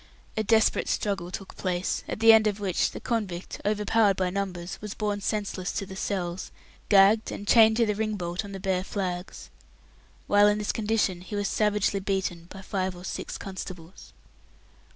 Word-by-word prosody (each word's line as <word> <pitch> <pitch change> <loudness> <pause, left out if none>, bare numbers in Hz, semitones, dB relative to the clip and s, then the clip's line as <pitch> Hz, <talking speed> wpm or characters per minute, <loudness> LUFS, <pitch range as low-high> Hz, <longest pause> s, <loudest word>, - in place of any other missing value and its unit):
A 220 - +1
desperate 220 0 +2
struggle 195 -4 -1
took 190 +1 -8
place, 180 -1 -2
at - - -4
the 225 0 +8
end 220 -1 +5
of 205 -1 -1
which 190 -4 +1
the - - -8
convict, 200 -7 -3
overpowered 210 0 +2
by 185 -1 0
numbers, 180 -2 -4
was 210 -1 -6
borne 205 -1 -2
senseless 200 -2 -2
to 195 - -3
the 190 0 -9
cells, 185 -2 -3 0.4
gagged, 205 +2 +5
and 205 - -7
chained 220 -1 +6
to 235 - +4
the 210 - 0
ring 215 +1 -2
bolt 175 0 -3
on 200 - -9
the 195 - -6
bare 185 -1 0
flags. 185 -2 -5 0.7
While 205 0 +5
in 210 0 +3
this 210 -1 -1
condition 210 -5 0
he 185 +3 -7
was 205 -1 0
savagely 210 -1 +1
beaten 190 -3 -2
by 195 0 -10
five 190 -2 -2
or 175 +1 -10
six - - -5
constables. 185 -2 -9
200 Hz, 180 wpm, -27 LUFS, 185-210 Hz, 0.7 s, the